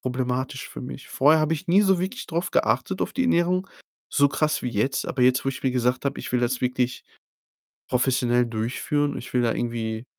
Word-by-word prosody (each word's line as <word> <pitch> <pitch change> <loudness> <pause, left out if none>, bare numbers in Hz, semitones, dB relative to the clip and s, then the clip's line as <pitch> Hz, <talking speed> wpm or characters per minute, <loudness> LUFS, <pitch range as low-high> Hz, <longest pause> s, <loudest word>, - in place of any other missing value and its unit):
problematisch 130 +1 -2
für - - -8
mich. 130 +2 -8
Vorher 155 +4 +4
habe 155 +1 +1
ich 165 +4 -4
nie 190 +4 +5
so 190 -2 +3
wirklich 190 +9 -4
drauf 170 +1 -2
geachtet 190 - +1
auf - - -3
die 260 - 0
Ernährung, 185 -3 +2 0.4
so 140 0 +3
krass 150 +2 0
wie 125 - -2
jetzt. 120 +4 0
Aber 135 - -3
jetzt, 125 +1 +4
wo 135 - +1
ich 135 - -8
mir 130 - +2
gesagt 125 +2 0
habe, 140 - -2
ich - - -6
will 125 - +2
das 120 +1 -1
wirklich 125 0 -1 0.8
professionell 125 -1 +2
durchführen, 125 +6 -1
ich 120 - -8
will 125 - +2
da 120 -1 +1
irgendwie 115 -1 -3
130 Hz, 205 wpm, -24 LUFS, 125-155 Hz, 0.8 s, nie